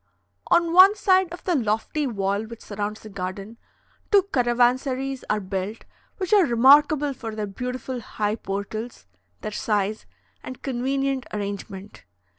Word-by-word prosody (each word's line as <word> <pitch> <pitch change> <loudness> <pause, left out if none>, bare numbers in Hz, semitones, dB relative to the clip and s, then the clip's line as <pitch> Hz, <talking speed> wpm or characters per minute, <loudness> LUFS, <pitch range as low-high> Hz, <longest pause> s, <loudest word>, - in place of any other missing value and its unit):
On 340 -1 +3
one 380 +3 +8
side 375 -4 +3
of 350 - -9
the 360 - 0
lofty 245 +3 0
wall 200 -2 -1
which 230 0 -11
surrounds 210 +1 -5
the 215 - -10
garden, 195 +4 -6 0.5
two 400 -2 +6
caravansaries 255 +2 +1
are 210 - +1
built, 195 +2 -5 0.3
which 375 0 -2
are 405 -2 +7
remarkable 285 +3 +5
for 225 -4 -7
their 215 -1 -2
beautiful 250 +5 -5
high 210 -2 -2
portals, 205 - -5 0.4
their 215 - -4
size, 210 0 -1 0.3
and 255 - -9
convenient 270 +1 -1
arrangement. 200 -1 -6
240 Hz, 135 wpm, -24 LUFS, 210-275 Hz, 0.5 s, one